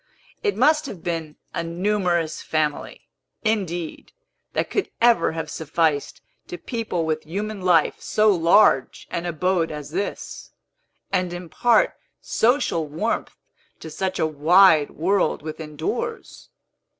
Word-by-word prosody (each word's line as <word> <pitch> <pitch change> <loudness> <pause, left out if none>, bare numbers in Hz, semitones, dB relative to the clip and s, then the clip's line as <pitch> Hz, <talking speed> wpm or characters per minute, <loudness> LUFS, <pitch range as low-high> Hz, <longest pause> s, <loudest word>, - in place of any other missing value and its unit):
It 415 -2 0
must 305 +3 +3
have 190 -10 -9
been 165 -3 -3 0.2
a 170 - -2
numerous 175 -2 -1
family, 155 -2 -2 0.4
indeed, 180 -7 -2 0.4
that - - -1
could 405 - -1
ever 235 -7 +4
have 160 -1 -4
sufficed 155 -1 -1 0.3
to 175 - -6
people 220 -8 -3
with 155 -1 -1
human 205 +5 -4
life 175 -4 +3
so 215 0 +3
large 170 -4 +3
an 170 +1 -3
abode 175 0 0
as 150 -1 -7
this, 195 +5 -5 0.6
and 180 -2 +1
impart 180 +7 +2 0.3
social 230 - +1
warmth 150 +3 -2 0.4
to 160 - -9
such 190 +2 -2
a - - +1
wide 155 +1 +5
world 185 -1 0
within 155 -1 -7
doors. 455 - -4
175 Hz, 125 wpm, -23 LUFS, 160-205 Hz, 0.6 s, wide